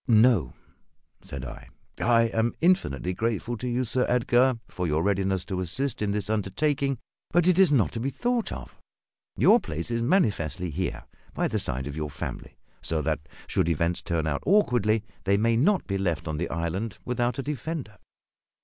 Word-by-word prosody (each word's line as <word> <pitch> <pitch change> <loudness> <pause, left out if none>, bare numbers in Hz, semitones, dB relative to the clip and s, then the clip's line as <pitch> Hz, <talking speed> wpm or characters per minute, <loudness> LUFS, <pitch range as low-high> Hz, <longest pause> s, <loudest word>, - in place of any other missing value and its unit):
"No," 115 - +4 0.7
said 65 -2 -7
I; 65 - -9 0.3
"I 115 -1 +4
am 115 +1 +1
infinitely 90 - +2
grateful 115 +3 -1
to 125 - -4
you, 125 +1 0
Sir 125 +2 +1
Edgar, 125 +1 +3
for 90 -1 -3
your 80 +1 +1
readiness 95 -2 0
to 95 - -3
assist 120 +9 -1
in 105 - +1
this 100 -1 -1
undertaking; 135 +7 0 0.3
but 175 +1 +3
it 185 0 +4
is 190 -5 +6
not 110 - +3
to - - -4
be 130 +4 -1
thought 240 - -1
of. 65 -2 -8 0.6
Your - - +6
place 80 +7 -4
is 115 0 0
manifestly 100 - +1
here, 90 +5 -3 0.3
by - - +1
the - - -1
side 65 +1 -2
of 70 -1 -5
your 75 -1 -3
family, 70 - -7 0.2
so 80 -2 -1
that, - - 0 0.3
should 85 - 0
events 85 +1 0
turn 85 -3 -1
out 70 -2 -1
awkwardly, 120 - +3 0.2
they 100 +1 +3
may 115 +2 +2
not 180 - +3
be 100 -1 -2
left 85 -5 -1
on 80 -1 -2
the 85 +2 -2
island 85 +6 -3
without 120 -1 0
a 135 - -2
defender. 145 -6 -4
110 Hz, 180 wpm, -26 LUFS, 85-125 Hz, 0.7 s, is